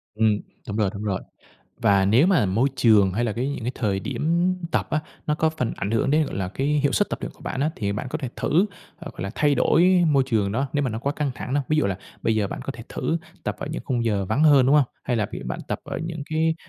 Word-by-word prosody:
Ừm, 110 Hz, -1 st, +2 dB, 0.3 s
đúng 105 Hz, -, -3 dB
rồi, 105 Hz, -3 st, +2 dB
đúng 100 Hz, -, -6 dB
rồi. 100 Hz, -3 st, -1 dB, 0.6 s
Và 100 Hz, -1 st, +4 dB
nếu 115 Hz, -, +5 dB
mà 165 Hz, -, +3 dB
môi 115 Hz, +9 st, +2 dB
trường 105 Hz, -5 st, +5 dB
hay 120 Hz, +5 st, 0 dB
là 110 Hz, -, 0 dB
cái 125 Hz, +5 st, -2 dB
những 140 Hz, -4 st, -4 dB
cái 125 Hz, -, -1 dB
thời 100 Hz, -5 st, -1 dB
điểm 165 Hz, -, 0 dB, 0.2 s
tập -, -, 0 dB
á, 155 Hz, -, +1 dB, 0.3 s
nó 150 Hz, -, +2 dB
có 160 Hz, +1 st, +1 dB
phần 125 Hz, -7 st, -2 dB
ảnh 100 Hz, -, -3 dB
hưởng 115 Hz, +4 st, +1 dB
đến, 155 Hz, 0 st, +3 dB
gọi -, -, -6 dB
là, 95 Hz, -2 st, -2 dB
cái 135 Hz, +8 st, -2 dB
hiệu 145 Hz, -1 st, +2 dB
suất 205 Hz, -, +2 dB
tập -, -, -3 dB
luyện -, -, -4 dB
của -, -, -25 dB
bạn 135 Hz, -, -3 dB
á, 150 Hz, -, +2 dB
thì 100 Hz, -3 st, -1 dB
bạn 105 Hz, -, -4 dB
có 155 Hz, -, -2 dB
thể 135 Hz, -5 st, -4 dB
thử 180 Hz, +7 st, +2 dB, 0.3 s
hoặc 170 Hz, -1 st, -9 dB
là 100 Hz, +2 st, -3 dB
thay 145 Hz, -1 st, +3 dB
đổi 180 Hz, +4 st, +4 dB
môi 140 Hz, -3 st, +4 dB
trường 105 Hz, -6 st, +1 dB
đó 135 Hz, +6 st, 0 dB
nếu 145 Hz, -, +1 dB
mà 130 Hz, -, 0 dB
nó 110 Hz, -, -3 dB
quá 140 Hz, +4 st, -1 dB
căng 150 Hz, -2 st, -1 dB
thẳng 130 Hz, -, -4 dB
đó. 145 Hz, -, +3 dB
Ví 155 Hz, -, +2 dB
dụ 150 Hz, -, +3 dB
là 95 Hz, -1 st, -2 dB, 0.2 s
bây 115 Hz, -, +2 dB
giờ 105 Hz, -2 st, +1 dB
bạn -, -, -5 dB
có -, -, -3 dB
thể 115 Hz, -, -10 dB
thử 165 Hz, -, -1 dB, 0.3 s
tập -, -, -2 dB
ở -, -, -5 dB
những 160 Hz, -, -4 dB
khung 120 Hz, -3 st, -1 dB
giờ 105 Hz, -4 st, +1 dB
vắng 110 Hz, +10 st, 0 dB
hơn, 145 Hz, -5 st, +6 dB
đúng 140 Hz, -, +5 dB
hông? 145 Hz, -3 st, +6 dB, 0.2 s
Hay 125 Hz, -, 0 dB
là 105 Hz, -3 st, +1 dB, 0.2 s
bạn 60 Hz, -, -4 dB
tập -, -, -1 dB
ở -, -, -4 dB
những 165 Hz, -3 st, -5 dB
cái 160 Hz, +1 st, +2 dB
130 Hz, 285 wpm, -24 LUFS, 105-150 Hz, 0.6 s, hơn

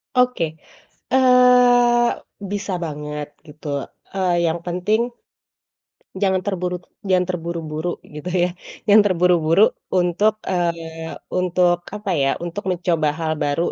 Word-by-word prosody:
Oke. 250 Hz, -11 st, +1 dB, 0.5 s
Eee, 250 Hz, -2 st, +5 dB, 0.4 s
bisa 205 Hz, -1 st, -3 dB
banget 150 Hz, -1 st, -5 dB, 0.2 s
gitu, 150 Hz, 0 st, -11 dB, 0.4 s
eee, 180 Hz, -3 st, +1 dB
yang 165 Hz, +1 st, 0 dB
penting, 180 Hz, +5 st, 0 dB, 1.2 s
jangan 190 Hz, -2 st, +2 dB
terburu 180 Hz, -2 st, -2 dB, 0.3 s
jangan 185 Hz, -1 st, +3 dB
terburu-buru 165 Hz, -1 st, -4 dB
gitu, 150 Hz, +2 st, -10 dB, 0.2 s
ya. 180 Hz, -, +2 dB, 0.3 s
Jangan 215 Hz, 0 st, +6 dB
terburu-buru 180 Hz, +1 st, +3 dB, 0.2 s
untuk, 185 Hz, +4 st, +2 dB
eee, 165 Hz, -2 st, -3 dB, 0.2 s
untuk 180 Hz, -1 st, +2 dB, 0.2 s
apa, 210 Hz, -2 st, -3 dB
ya, 135 Hz, -5 st, +2 dB
untuk 175 Hz, +3 st, -5 dB
mencoba 175 Hz, -3 st, 0 dB
hal 160 Hz, -1 st, -1 dB
baru 145 Hz, +4 st, 0 dB
180 Hz, 110 wpm, -21 LUFS, 165-205 Hz, 1.2 s, Jangan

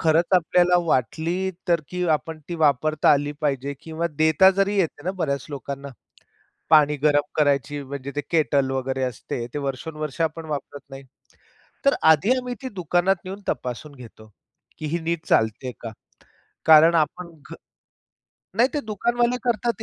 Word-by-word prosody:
खरंच 165 Hz, +1 st, +3 dB
आपल्याला 180 Hz, +1 st, +3 dB
वाटली 165 Hz, +8 st, 0 dB, 0.2 s
तर, 170 Hz, -2 st, +3 dB
की 180 Hz, 0 st, -3 dB
आपण 160 Hz, +1 st, -1 dB
ती 175 Hz, -, -4 dB
वापरता 155 Hz, -1 st, +2 dB
आली 145 Hz, 0 st, 0 dB
पाहिजे 140 Hz, -1 st, -1 dB
किंवा 160 Hz, +1 st, -3 dB
देता 160 Hz, +4 st, +5 dB
जरी 200 Hz, +1 st, +2 dB
येते 165 Hz, -5 st, -1 dB
ना, 185 Hz, -, 0 dB
बऱ्याच 140 Hz, -8 st, -2 dB
लोकांना. 140 Hz, 0 st, -6 dB, 0.8 s
पाणी 150 Hz, -2 st, +5 dB
गरम 145 Hz, 0 st, +3 dB
करायची 145 Hz, -1 st, +1 dB
म्हणजे 140 Hz, 0 st, -7 dB
ते 145 Hz, -, -1 dB
केटल 145 Hz, -5 st, +2 dB
वगैरे 130 Hz, 0 st, -2 dB
असते, 120 Hz, -1 st, -4 dB
ते -, -, -3 dB
वर्षोनवर्ष 150 Hz, +2 st, -5 dB
आपण 160 Hz, 0 st, -2 dB
वापरत 145 Hz, -1 st, -5 dB
नाही. 135 Hz, 0 st, -10 dB, 0.8 s
तर 275 Hz, -, +5 dB, 0.2 s
आधी 160 Hz, +9 st, +3 dB
आम्ही 250 Hz, -1 st, -4 dB
ती 260 Hz, -, -5 dB
दुकानात 180 Hz, +1 st, +1 dB
येऊन 195 Hz, +2 st, -7 dB
तपासून 125 Hz, +4 st, -4 dB
घेतो, 115 Hz, -4 st, -14 dB, 0.5 s
की 155 Hz, -, -6 dB
ही 170 Hz, -, 0 dB
नीट 165 Hz, 0 st, -3 dB
चालते 110 Hz, +4 st, +1 dB
का? 115 Hz, -2 st, -7 dB, 0.8 s
कारण 160 Hz, +1 st, +7 dB
आपण 170 Hz, +3 st, 0 dB, 0.2 s
घ -, -, -6 dB, 1.0 s
नाही 240 Hz, +3 st, +4 dB
ते 295 Hz, -, 0 dB
दुकानवाले 240 Hz, +2 st, 0 dB
करतात 235 Hz, -1 st, -1 dB
155 Hz, 150 wpm, -23 LUFS, 140-180 Hz, 1.0 s, कारण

